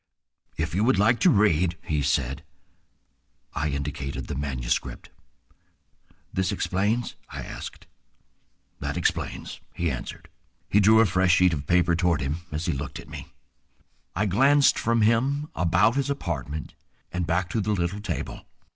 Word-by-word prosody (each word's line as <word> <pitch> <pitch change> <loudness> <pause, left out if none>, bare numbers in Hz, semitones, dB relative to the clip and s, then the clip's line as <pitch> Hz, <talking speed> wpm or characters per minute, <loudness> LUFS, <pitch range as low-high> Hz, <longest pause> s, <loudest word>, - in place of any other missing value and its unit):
"If 80 0 -2
you 100 +5 +1
would 120 -3 +3
like 110 +4 +4
to - - +5
read—" 90 -4 +3
he 75 -2 -1
said. 70 -1 0 1.1
I 75 +2 -1
indicated 70 -1 -4
the - - -5
manuscript. 65 -3 -3 1.2
"This 95 +1 0
explains?" 105 +4 0 0.2
I - - -6
asked. - - -8 0.9
"That - - -3
explains," - - -2 0.2
he 85 -2 0
answered. 65 - -7 0.4
He 105 - +3
drew 110 +2 +6
a - - +5
fresh 95 -2 +3
sheet 90 -2 +4
of 70 -1 -4
paper 90 -1 +3
toward 85 -2 +2
him 70 +1 -2
as 75 +2 -3
he 85 - 0
looked 70 +1 -5
at - - -12
me. - - -9 0.8
I 105 - +1
glanced 135 +9 +4
from 115 -1 +2
him 135 +7 +2
about 90 +6 +3
his 140 0 0
apartment 80 - -4 0.4
and 90 -1 -2
back 85 +1 +1
to 110 - 0
the 105 +2 -1
little 95 +2 -1
table. 105 - -5
90 Hz, 150 wpm, -26 LUFS, 75-105 Hz, 1.2 s, drew